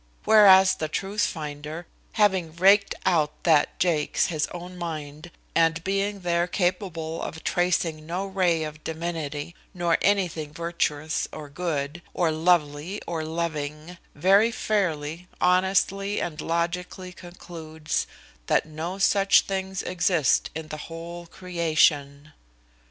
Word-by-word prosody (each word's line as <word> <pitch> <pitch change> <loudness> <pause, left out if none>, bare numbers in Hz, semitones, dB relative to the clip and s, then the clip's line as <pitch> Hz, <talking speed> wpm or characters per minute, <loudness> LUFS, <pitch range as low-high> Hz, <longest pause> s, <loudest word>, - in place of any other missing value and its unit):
whereas 190 -3 +7
the 155 - -3
truth 195 +6 -2
finder, 150 0 -4 0.3
having 190 -6 +2
raked 200 +3 +4
out 160 -5 +1
that 155 -4 +3
jakes, 165 -4 +1
his 150 -2 0
own 175 +1 -8
mind, 155 -2 -6 0.2
and 165 0 +2
being 195 +1 -1
there 175 0 +1
capable 175 -3 -2
of 160 - -6
tracing 170 -3 0
no 180 +4 -2
ray 180 -4 +1
of 155 0 -7
divinity, 160 -2 -4 0.2
nor 175 -2 +1
anything 175 -6 +1
virtuous 160 -2 -2
or 150 -2 -8
good, 150 0 -3
or 170 -3 +2
lovely, 160 +2 +1
or 165 -2 -3
loving, 155 0 -4 0.2
very 195 +8 +4
fairly, 175 -7 -2
honestly, 195 +2 +2
and 160 -3 -4
logically 180 +2 -3
concludes 165 -3 -5 0.4
that - - +2
no 160 +4 -5
such 195 0 +4
things 190 -1 -3
exist 175 -5 +2
in 160 -1 -6
the 155 - -5
whole 170 +1 -8
creation. 155 -5 0
170 Hz, 120 wpm, -25 LUFS, 155-185 Hz, 0.4 s, whereas